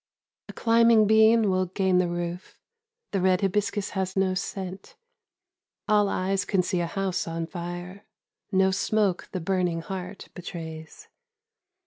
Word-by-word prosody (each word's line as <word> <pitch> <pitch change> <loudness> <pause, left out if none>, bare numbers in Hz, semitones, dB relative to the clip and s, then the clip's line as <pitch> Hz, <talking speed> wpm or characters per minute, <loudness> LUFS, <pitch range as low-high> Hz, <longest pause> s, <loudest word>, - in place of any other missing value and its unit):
"A - - -7
climbing 230 -1 +4
bean 220 0 +5
will 185 0 +1
gain 185 0 +1
the 180 - +2
roof; 175 +1 -5 0.5
The 195 - 0
red 185 +1 +3
hibiscus 205 +1 -1
has 190 -1 -3
no 190 -1 +2
scent. 190 0 -5 0.9
All 210 -1 +3
eyes 195 +1 0
can 190 -2 +1
see 180 0 -1
a 170 - -1
house 190 0 -2
on 165 0 -3
fire; 175 +3 -7 0.5
No 190 -1 +3
smoke 200 -1 0
the 185 - -3
burning 180 -1 0
heart 190 +1 -7
betrays. 160 -3 -8
190 Hz, 135 wpm, -26 LUFS, 180-200 Hz, 0.9 s, bean